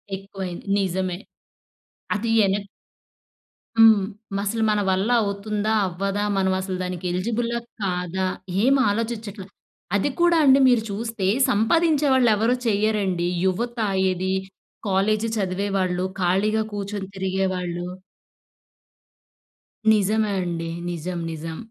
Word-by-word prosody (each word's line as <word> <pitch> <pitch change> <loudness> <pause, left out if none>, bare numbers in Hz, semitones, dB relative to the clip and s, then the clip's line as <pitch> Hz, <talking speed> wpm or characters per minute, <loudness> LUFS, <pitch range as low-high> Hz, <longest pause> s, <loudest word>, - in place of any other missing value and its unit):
ఎక్కువయింది. 190 -2 -7
నిజమే. 185 -1 -1 1.0
అది 225 +2 -1 0.2
ఎనక్ 200 +1 -1 1.1
హ్మ్. 220 -3 +6 0.4
అసలు 220 +2 -1
మన 210 -1 +2
వల్ల 190 +5 +1
అవుతుందా? 205 +1 -2 0.2
అవ్వదా? 195 +3 -2
మనమసల 190 0 0
దానికి 180 -1 -5
ఎలిజిబుల్లా? 235 +6 -1 0.2
కాదా? 185 0 -1 0.4
ఏం 270 +2 +5
ఆలోచించట్ల. 220 -2 -3 0.5
అది 205 +8 +1
కూడా 345 -1 +5
అండి 270 0 +7
మీరు 240 -3 +4
చూస్తే 220 -2 -3 0.2
సంపాదించే 295 +7 +3
వాళ్ళెవరు 235 -1 +3
చెయ్యరండి. 200 -4 +1 0.2
యువత, 235 +6 -1 0.3
ఏది? 185 +1 -1 0.5
కాలేజు 210 +3 +1
చదివేవాళ్ళు, 185 -1 -1 0.2
ఖాళీగా 210 +5 +2
కూర్చొని 200 -1 -4
తిరిగేవాళ్ళు 185 -2 -2 2.1
నిజమే 210 +1 +1
అండి. 165 -2 -3 0.2
నిజం. 175 +1 -4
నిజం. 160 0 -6
200 Hz, 95 wpm, -23 LUFS, 185-220 Hz, 2.1 s, అండి